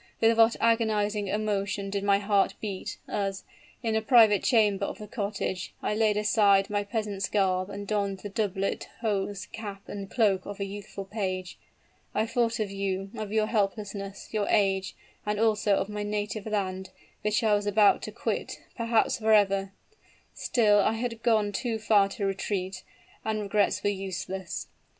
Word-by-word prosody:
with 225 0 +4
what 225 0 +5
agonizing 215 -3 +1
emotion 200 -1 -1
did 200 0 -2
my 200 -1 +4
heart 200 -1 +2
beat, 200 -3 -5
as, 195 -1 -2 0.4
in 225 -1 0
a 220 - +2
private 220 -4 +6
chamber 210 -5 +3
of - - -3
the 210 - -8
cottage, 200 -3 -3
I - - 0
laid 215 -1 +2
aside 205 -2 +3
my 205 0 +1
peasant's 205 -2 -3
garb 185 -2 +1
and 200 0 -6
donned 200 -2 -1
the 205 - -6
doublet, 195 -2 -2
hose, 205 -2 -1
cap 205 -3 -7
and 200 -1 -6
cloak 200 -6 +2
of 205 0 -7
a 200 - -1
youthful 195 0 -7
page. 185 -3 -4 0.6
I 220 - +2
thought 230 0 0
of 210 -2 -1
you 195 0 -3
of 215 -2 -5
your 215 0 +2
helplessness 200 -2 -3
your 210 -2 0
age, 195 -2 +2 0.3
and 210 0 -1
also 215 -2 +3
of 195 - -1
my 210 0 -4
native 210 0 -3
land, 190 -3 -2 0.3
which 210 +2 +1
I 215 -1 +4
was 205 0 +1
about 205 0 +4
to - - -6
quit - - -3 0.2
perhaps 230 -1 +1
forever! 200 -3 +3 0.6
Still 210 -4 +3
I 215 - +3
had 230 0 -3
gone 215 -3 +2
too 225 +2 -2
far 210 -2 +3
to 200 0 -3
retreat, 190 -1 -2 0.4
and 220 -1 -1
regrets 205 0 +1
were 205 - +2
useless. 190 -1 -4
205 Hz, 165 wpm, -28 LUFS, 195-215 Hz, 0.6 s, private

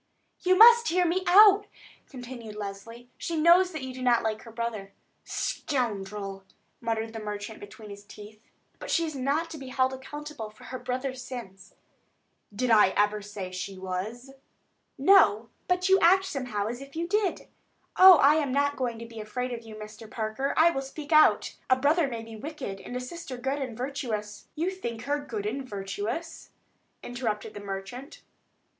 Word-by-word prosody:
"You 370 0 +3
must 470 +2 +8
hear 360 +1 +2
me 360 +2 0
out," 410 +2 +7 0.4
continued 245 -4 -9
Leslie. 215 +4 -8
"She 335 - -3
knows 340 +4 +6
also 360 - -13
that 310 - -5
you 260 -1 -6
do 255 - -8
not 245 -2 +3
like 220 -1 -2
her 230 - -12
brother." 220 -4 -5 0.3
"Scoundrel!" 205 -7 -3 0.4
muttered 225 -1 -3
the 225 - -5
merchant 210 0 -6
between 205 +1 -11
his 200 0 -10
teeth. 210 +1 -13 0.4
"But - - -8
she 335 - +2
is 310 - -5
not 285 +5 -1
to 310 - -7
be 265 - -9
held 260 0 +1
accountable 280 -3 -7
for 215 0 -18
her 255 - -7
brother's 255 +1 -4
sins." 220 -7 -9 0.8
"Did 235 +4 -1
I 215 -3 +7
ever 210 0 +2
say 200 -2 -7
she 185 +1 -6
was?" 195 +8 -5 0.7
"No; 265 - +5 0.2
but 360 0 +1
you 385 0 +5
act 380 +3 +5
somehow 250 - -3
as 240 +4 -4
if 275 +1 -12
you 335 +1 -2
did. 410 -1 -1 0.5
Oh, 375 0 +10
I 290 +2 +5
am 290 -4 0
not 285 +1 +1
going 245 -3 -2
to 230 - -8
be 230 -1 -10
afraid 250 +4 -4
of 235 - -6
you, 220 -1 -11
Mr. 215 +1 -10
Parker. 220 +6 -3
I 335 +2 +6
will 270 - -2
speak 290 +3 -9
out. 310 0 +5
A 260 - +6
brother 290 +4 +2
may 230 -3 -5
be 225 0 -10
wicked 255 -6 -7
and 245 - -8
a - - -1
sister 260 0 -7
good 270 +3 -2
and 245 -4 -5
virtuous——" 240 -6 -4
"You 335 +4 -1
think 235 -12 -6
her 290 +2 -1
good 220 -8 -5
and 260 +6 -3
virtuous?" 215 - -5 0.5
interrupted 225 -4 -4
the - - -7
merchant. 205 +8 -7
250 Hz, 180 wpm, -27 LUFS, 215-295 Hz, 0.8 s, Oh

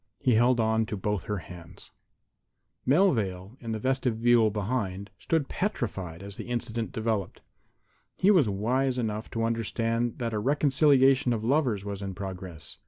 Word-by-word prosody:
He 125 - +2
held 120 +2 +4
on 110 0 +2
to 105 - -4
both 105 -1 -2
her 105 - -2
hands. 85 -1 -11 1.0
Melvale, 115 - +2
in 115 -2 -6
the 110 - -1
vestibule 120 -2 +2
behind, 100 -2 -3
had 105 - -30
stood 160 -4 0
petrified 100 - -3
as 100 0 -8
the - - -6
incident 120 -1 -3
developed. 110 -6 -2 0.8
He 195 +2 +4
was 160 - +4
wise 125 +6 0
enough 110 -2 -3
to 115 - -2
understand 115 +1 -1
that 115 -2 -3
a 105 - 0
reconciliation 135 0 +3
of 110 -2 -3
lovers 120 -6 +1
was 100 -1 -5
in 95 -1 -5
progress. 90 -4 -8
115 Hz, 155 wpm, -28 LUFS, 100-130 Hz, 1.0 s, held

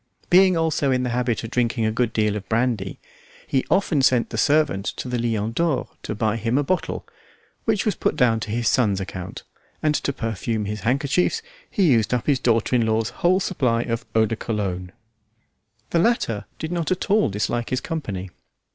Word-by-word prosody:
Being 185 0 +6
also 160 -3 +1
in 125 -1 +2
the 125 - -1
habit 120 -1 0
of 115 - -6
drinking 120 -2 +1
a 110 - +2
good 115 +1 0
deal 105 -1 +1
of 100 -2 -6
brandy, 110 -5 0 0.5
he 130 - 0
often 170 -7 +2
sent 125 -3 +3
the - - -4
servant 145 -9 +2
to - - -5
the 125 -1 -1
Lion 115 -2 -1
d'Or 165 +2 0
to 105 - -4
buy 110 +1 0
him 115 +3 0
a 145 - +2
bottle, 185 +6 -2 0.6
which 215 -3 +1
was 215 - +2
put - - -1
down 115 -3 +3
to 110 - -6
his 115 +2 -1
son's 105 -6 +2
account, 95 -1 -6 0.4
and 155 -1 +3
to 140 - 0
perfume 115 -2 -2
his 105 +1 -4
handkerchiefs 140 - +1 0.3
he 200 - +1
used 115 -1 +3
up 120 - -2
his 140 -3 +2
daughter 115 -1 +2
in 120 - +3
law's 110 +1 +1
whole 185 +2 +4
supply 125 -11 0
of 115 -1 -3
eau 110 0 +5
de 115 - -2
cologne. 95 -5 -3 1.0
The 170 - +3
latter 165 - +1
did 160 - -5
not 170 -2 -1
at 185 +2 -1
all 210 - +4
dislike 110 +4 -2
his 130 - 0
company. 100 - -5
120 Hz, 195 wpm, -23 LUFS, 110-145 Hz, 1.0 s, Being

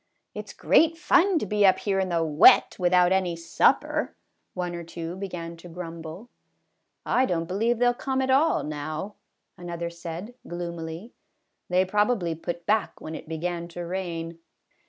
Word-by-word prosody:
" - - -53
It - - -7
's - - -9
great 325 0 +3
fun 360 +2 +3
to 300 - -1
be 210 +1 +1
up 190 -2 +6
here 195 -2 -1
in 190 -1 0
the 170 -1 +1
wet 150 -1 +6
without 180 0 +4
any 185 -3 +1
supper," 165 0 +1 0.4
one 180 -1 -3
or 170 0 -5
two 170 +1 -6
began 175 -3 -6
to 175 +1 -12
grumble. 165 +3 -8 0.4
" - - -51 0.2
I 260 - +3
don't 165 -2 -1
believe 220 +7 0
they 245 - +2
'11 245 0 +2
come 265 -1 0
at 260 - 0
all, 285 +5 +3
now," 155 +6 -5 0.5
another 170 -1 -5
said 170 +6 -7
gloomily; 170 +3 -6 0.6
"they 180 +1 +3
probably 205 -3 +1
put 170 +1 -6
back 215 0 0
when 155 - -7
it 160 - -8
began 170 +1 -3
to 175 0 -7
rain." 170 -2 -4
175 Hz, 175 wpm, -26 LUFS, 170-205 Hz, 0.6 s, up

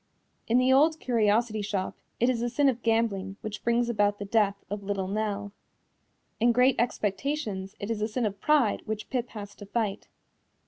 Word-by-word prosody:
In 235 - +3
The 255 +1 +4
Old 310 +4 +4
Curiosity 220 -2 +1
Shop 200 -2 -2 0.2
it 240 - +3
is 255 -2 +1
the 240 +1 -1
sin 280 +4 +2
of 245 -3 +1
gambling 220 -4 0
which 215 -1 -6
brings 235 0 +2
about 205 -3 +1
the 205 - -5
death 200 -1 +2
of 205 +1 -4
Little 195 -1 -2
Nell. 205 0 -2 0.9
In 240 +2 +4
Great 250 +2 +4
Expectations 210 -2 -2
it 205 +3 -4
is 225 - -2
the 215 - 0
sin 230 +2 -1
of 200 -1 -3
pride 290 -8 +3
which 215 0 -4
Pip 245 -2 -1
has 205 -2 -8
to 205 - -11
fight. 210 -2 -2
220 Hz, 185 wpm, -28 LUFS, 205-240 Hz, 0.9 s, The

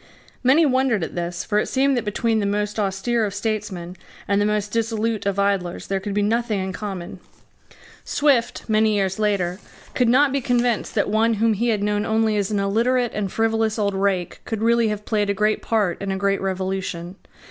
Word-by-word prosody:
Many 275 +6 +5
wondered 260 - +2
at - - -5
this: 175 0 -3
for 210 -1 +1
it - - -1
seemed 275 +1 +2
that 240 - -1
between 220 +2 0
the 200 - 0
most 210 +1 -1
austere 210 +4 0
of 200 -2 -2
statesmen 200 -5 -3 0.3
and 200 +1 +2
the 205 - +2
most 210 -1 -1
dissolute 225 -2 -1
of 200 -1 -1
idlers 200 -3 0
there 195 0 -1
could 200 +1 -5
be 205 - +2
nothing 225 0 0
in 190 0 -3
common. 190 -4 -6 0.8
Swift, 275 -5 +1
many 215 -1 +3
years 195 -1 0
later, 195 -4 0 0.3
could 245 -2 +2
not 270 +3 +4
be 275 0 0
convinced 245 -2 0
that 205 - +2
one 220 +2 +2
whom 225 +1 +2
he 230 +4 -1
had 210 -3 0
known 205 0 0
only 220 0 +1
as 200 -2 0
an 210 -2 0
illiterate 235 +5 +1
and 200 -3 -2
frivolous 225 0 0
old 200 -2 0
rake 190 -3 -1
could 220 -1 -4
really 235 0 +3
have 210 -1 -3
played 210 -2 0
a 200 - +1
great 215 +2 +1
part 205 -6 0
in 200 -1 -2
a 190 - -1
great 200 0 0
revolution. 190 -2 -3
210 Hz, 200 wpm, -22 LUFS, 195-225 Hz, 0.8 s, Many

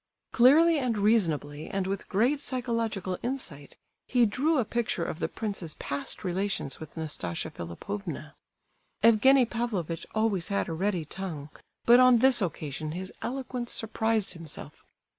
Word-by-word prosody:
Clearly 305 +6 +6
and 245 -5 0
reasonably, 165 -9 +1
and 195 -1 -1
with 195 +1 -4
great 245 +9 +2
psychological 230 -8 -2
insight, 210 - -5 0.3
he 245 -2 +4
drew 285 +9 +1
a 250 - +2
picture 225 -7 -1
of 160 - -5
the - - 0
prince's 195 -7 -4
past 140 0 -2
relations 185 -5 -2
with 155 +1 -10
Nastasia 150 - -3
Philipovna. 155 - -6 0.7
Evgenie 250 +4 +6
Pavlovitch 210 -9 -3
always 215 -6 +1
had 200 -1 -1
a 165 - -3
ready 180 -1 -1
tongue, 155 -4 -6 0.3
but 240 +1 +7
on 255 -1 +7
this 250 0 +5
occasion 155 -3 -3
his 185 +2 -6
eloquence, 250 -2 -4
surprised 220 -1 0
himself. 165 -4 -8
205 Hz, 140 wpm, -28 LUFS, 165-240 Hz, 0.7 s, but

